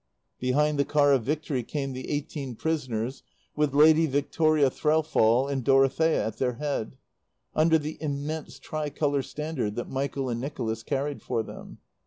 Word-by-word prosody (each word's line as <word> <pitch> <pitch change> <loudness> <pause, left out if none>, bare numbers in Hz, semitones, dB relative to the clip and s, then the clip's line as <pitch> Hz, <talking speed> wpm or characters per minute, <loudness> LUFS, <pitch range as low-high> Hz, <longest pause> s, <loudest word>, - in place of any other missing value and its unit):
Behind 145 +4 +1
the - - +5
Car 145 -1 +3
of 125 -5 +1
Victory 150 -2 -1
came 135 +2 -4
the 130 0 -6
eighteen 145 -3 -4
prisoners 130 -5 -2 0.3
with 150 -2 +1
Lady 160 +2 +6
Victoria 145 0 +2
Threlfall 140 -6 +2
and 135 -2 -2
Dorothea 135 +5 +3
at 110 0 -4
their 125 -1 0
head, 135 -3 -3 0.6
under 160 +1 +4
the 155 0 -5
immense 150 +1 -4
tricolour 145 -2 -1
standard 140 -7 -4
that 120 - -5
Michael 135 0 -2
and 120 -1 -2
Nicholas 115 -5 -3
carried 140 +4 -2
for 115 -3 -1
them. - - -10
140 Hz, 150 wpm, -27 LUFS, 130-150 Hz, 0.6 s, Lady